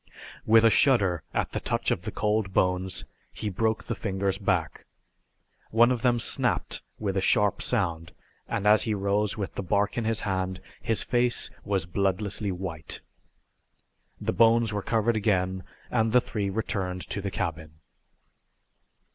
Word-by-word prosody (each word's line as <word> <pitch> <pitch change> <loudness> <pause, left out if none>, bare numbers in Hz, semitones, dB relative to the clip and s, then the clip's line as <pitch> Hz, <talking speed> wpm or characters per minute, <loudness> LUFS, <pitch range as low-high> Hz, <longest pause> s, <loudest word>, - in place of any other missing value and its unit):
With 110 +1 +6
a 115 - +6
shudder 100 - +3
at - - -1
the - - -2
touch - - -1
of - - 0
the - - -5
cold 105 -2 0
bones 90 0 0 0.3
he 105 - -4
broke 110 +4 0
the 120 - -3
fingers 95 -2 -2
back. 90 -6 -1 0.8
One 120 +3 +5
of 125 -3 -1
them 120 -1 +3
snapped 115 - 0 0.2
with 100 -3 -2
a 95 - +1
sharp 105 0 +2
sound, 80 -1 -1 0.4
and 105 - -2
as 105 +1 +6
he 110 -3 0
rose 100 +1 0
with 100 -2 -4
the - - -4
bark 100 +4 0
in 115 - -3
his 115 0 0
hand 95 -1 -2 0.2
his 115 - +1
face 120 0 +1
was 95 -4 -1
bloodlessly 100 +3 -1
white. 90 -4 -5 1.2
The - - -2
bones 115 -1 +4
were 105 - -1
covered 115 +2 +1
again 95 -3 0 0.3
and 110 -2 +2
the 125 - +6
three 105 -4 -3
returned 95 -3 -2
to 100 - -3
the 100 - -3
cabin. 80 -4 -4
100 Hz, 155 wpm, -27 LUFS, 95-110 Hz, 1.2 s, With